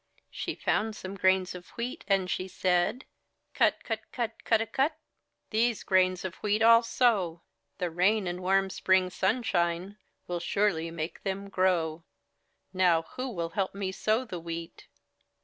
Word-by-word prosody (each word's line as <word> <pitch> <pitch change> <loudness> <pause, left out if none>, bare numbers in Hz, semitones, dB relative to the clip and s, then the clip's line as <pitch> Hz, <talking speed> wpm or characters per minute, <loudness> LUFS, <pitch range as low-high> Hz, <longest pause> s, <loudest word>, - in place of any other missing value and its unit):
She - - -4
found 220 0 0
some 185 -1 -7
grains 190 -1 +2
of 180 -1 -10
wheat 240 +2 -4
and 195 -2 +2
she 185 +1 -2
said: 180 +6 0 0.2
— - - -50
'*Cut, - - +2
cut, 225 -1 -3
cut, 230 -3 -4
cudawcut! 225 +7 +1 0.6
These 230 +1 +1
grains 185 -1 +2
of 185 - -3
wheat 210 +1 +1
FU 230 0 +8
sow; 205 -8 +1 0.3
The 180 -3 -2
rain 190 +5 +2
and 175 0 -3
warm 195 +1 +2
Spring 185 -1 +2
sunshine 190 -2 0 0.3
Will 175 -1 -3
surely 170 -2 0
make 165 0 -5
them 195 +1 -4
grow. 170 -4 +1 0.7
Now 180 -3 +3
who 255 +1 -3
will 170 -7 -3
help 195 +2 -2
me 195 -1 -2
sow 220 +6 0
the 185 -7 -6
wheat?" 165 0 -7
190 Hz, 150 wpm, -29 LUFS, 175-215 Hz, 0.7 s, FU